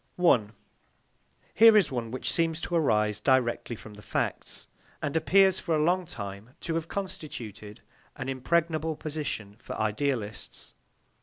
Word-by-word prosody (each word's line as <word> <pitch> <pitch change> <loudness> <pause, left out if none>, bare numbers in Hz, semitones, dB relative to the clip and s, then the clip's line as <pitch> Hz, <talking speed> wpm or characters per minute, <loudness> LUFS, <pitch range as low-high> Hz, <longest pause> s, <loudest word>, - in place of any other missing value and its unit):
1. 125 -12 +3 1.0
Here 225 -1 +8
is 190 -8 +3
one 120 -3 -3
which 130 +2 -3
seems 165 -1 +1
to 175 - -5
arise 105 -10 +2
directly 120 -1 +1
from 110 0 -12
the 105 - -12
facts, - - -3 0.3
and 145 0 -3
appears 190 +3 +4
for 165 -3 0
a 150 - +2
long 180 +2 +2
time 100 - -8
to 165 - -2
have 165 0 -2
constituted 115 - -6 0.3
an 130 - -5
impregnable 155 +4 0
position 145 -10 -4
for - - -7
idealists. 110 -1 -2
140 Hz, 140 wpm, -28 LUFS, 110-165 Hz, 1.0 s, Here